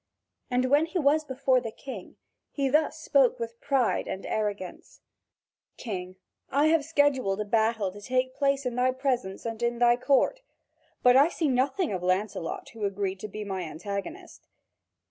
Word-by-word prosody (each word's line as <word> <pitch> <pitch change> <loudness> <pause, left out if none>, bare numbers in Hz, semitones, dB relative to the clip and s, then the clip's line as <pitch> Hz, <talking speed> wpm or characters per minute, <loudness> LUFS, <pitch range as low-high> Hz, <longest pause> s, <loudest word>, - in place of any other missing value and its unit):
And 250 0 +1
when 295 +3 +4
he 360 - -3
was 305 0 +3
before 260 -2 +1
the 230 - -4
King, 220 -3 -9 0.3
he 275 -2 -1
thus 305 +2 +2
spoke 280 -4 +3
with 230 0 -6
pride 270 -4 +1
and 190 - -5
arrogance: 205 -4 -4 0.8
"King, 185 -5 -5 0.3
I 290 +3 +3
have 325 -2 +3
scheduled 280 -10 +1
a 210 - -1
battle 220 -2 +1
to 205 +2 -12
take 255 +3 0
place 275 0 0
in 250 - -1
thy 250 +1 +2
presence 255 -8 -2
and 225 0 -4
in 235 0 0
thy 240 0 +4
court. 280 - +2 0.6
But 250 0 +6
I 285 +4 +6
see 325 -3 -1
nothing 265 - +1
of 185 - -3
Lancelot 185 -1 -2
who 225 -2 -9
agreed 195 -1 -2
to 215 - -5
be 210 +1 -6
my 190 -2 -4
antagonist. 200 - -6
245 Hz, 165 wpm, -27 LUFS, 205-280 Hz, 0.8 s, But